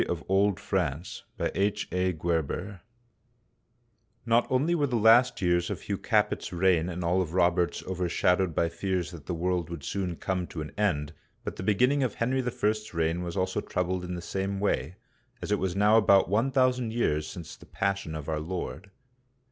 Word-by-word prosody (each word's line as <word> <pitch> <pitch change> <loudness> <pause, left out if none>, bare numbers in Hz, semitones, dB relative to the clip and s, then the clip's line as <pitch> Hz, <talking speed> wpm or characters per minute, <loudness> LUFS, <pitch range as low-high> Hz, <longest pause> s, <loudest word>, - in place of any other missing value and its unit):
THE - - -1 0.2
WEALTH 100 +1 +1
OF 85 -2 -1
THE 95 -3 -1
CLERGY 85 +4 -2 1.5
NOT 115 0 +3
only 140 +7 +2
were 150 -4 +2
the 125 - -2
last 115 0 +5
years 85 0 +2
of - - -4
Hugh - - -3
Capet's - - 0
reign 90 -1 +2
and 90 0 -4
all 90 +2 +2
of 85 -1 -4
Robert's 85 -1 +2
overshadowed 90 -1 +1
by 85 - +2
fears 90 +1 -2
that 80 -5 -11
the 90 - -2
world 90 -1 -1
would 85 -4 -7
soon 90 +2 -2
come 90 +1 -2
to 80 - -6
an 75 - -9
end, 80 -8 0 0.3
but - - -5
the - - -5
beginning 125 +9 +2
of 130 -4 -1
Henry 130 +3 0
L's 110 -4 -2
reign 80 +1 0
was 90 +2 -5
also 95 0 0
troubled 90 0 -2
in 90 0 -4
the 85 - -5
same 95 +2 -2
way, 90 -5 -1 0.4
as - - -5
it 105 - +2
was 95 -1 -1
now 105 +2 +5
about 100 -3 +5
one 110 +8 +2
thousand 130 -3 +2
years 75 -10 0
since 85 -1 -8
the - - -17
Passion 100 -5 -2
of 75 -2 -6
our 80 -1 -1
Lord. 90 +4 -5
95 Hz, 180 wpm, -28 LUFS, 85-105 Hz, 1.5 s, last